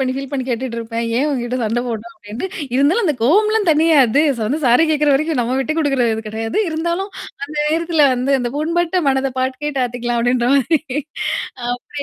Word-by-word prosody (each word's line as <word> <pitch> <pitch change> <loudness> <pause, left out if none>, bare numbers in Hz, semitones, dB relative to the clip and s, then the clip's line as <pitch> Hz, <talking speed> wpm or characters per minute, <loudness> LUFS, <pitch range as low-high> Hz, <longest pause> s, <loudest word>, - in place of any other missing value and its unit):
பண்ணி 260 -1 0
ஃபீல் 275 0 -5
பண்ணி 265 -2 -2
கேட்டுட்டு 240 -1 -3
இருப்பேன். 230 0 -4
ஏன் 275 +5 +2
உன்கிட்ட 250 -2 -2
சண்ட 225 +2 0
போட்டும் 230 +8 -5
அப்டின்ட்டு 240 - -6 0.3
இருந்தாலும் 310 - +3
அந்த 305 -6 +1
கோவம்லாம் 420 - +3
தணியாது. 300 -4 +4 0.2
வந்து 255 +9 -1
சாரி 245 +7 +5
கேட்குற 300 -1 +2
வரைக்கும் 310 -1 0
நம்ம 245 +2 -1
விட்ட 310 +4 -1
குடுக்குற 275 -5 +1
இது 220 - -5
கிடையாது. 225 - -3
இருந்தாலும் 340 +5 -2 0.3
அந்த 300 +2 -9
நேரத்தில 325 -1 +2
வந்து 255 +3 0
அந்த 240 -1 -2
புண்பட்ட 340 +3 0
மனத 265 0 +1
பாட்டு 260 0 -1
கேட்டு 285 -3 -1
ஆத்திக்கலாம் 240 -1 -2
அப்டின்ற 245 0 +1
மாரி. 285 +3 +2 0.9
அப்டி 245 +4 -5
270 Hz, 180 wpm, -18 LUFS, 245-315 Hz, 0.9 s, சாரி